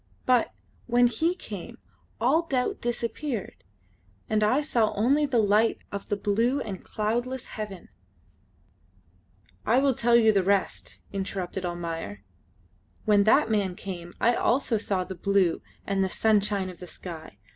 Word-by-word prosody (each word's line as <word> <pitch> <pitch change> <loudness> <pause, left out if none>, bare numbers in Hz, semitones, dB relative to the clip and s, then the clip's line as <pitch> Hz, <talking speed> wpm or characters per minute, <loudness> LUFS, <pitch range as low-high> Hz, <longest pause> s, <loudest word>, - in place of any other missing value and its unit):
But, 250 -2 +3 0.4
when 245 0 +4
he 320 +10 +1
came, 205 - -8 0.4
all 310 +8 +2
doubt 255 -4 -1
disappeared, 240 0 -3 0.6
and 215 -1 +1
I 220 +7 +3
saw 235 -7 +1
only 275 +8 +3
the 260 -3 0
light 215 +1 +3
of 200 -1 -6
the 205 - 0
blue 230 +7 +1
and 190 -3 -6
cloudless 240 +4 -2
heaven 205 -4 -7 0.9
" 95 0 -35
"I 235 - +3
will 270 0 +3
tell 235 0 +3
you 225 -2 +6
the 200 -2 +3
rest," 195 +1 -1 0.2
interrupted 190 -1 -3
Almayer: 165 - -5 0.8
"when 205 -2 +4
that 230 +3 +4
man 200 -4 0
came 175 -3 -7
I 235 - +4
also 240 0 +1
saw 195 -3 -1
the 190 - -7
blue 190 -1 +1 0.2
and 195 -1 +1
the 190 - 0
sunshine 205 -2 +1
of 180 - -15
the 180 - -9
sky. 160 - -9
210 Hz, 145 wpm, -27 LUFS, 185-240 Hz, 0.9 s, you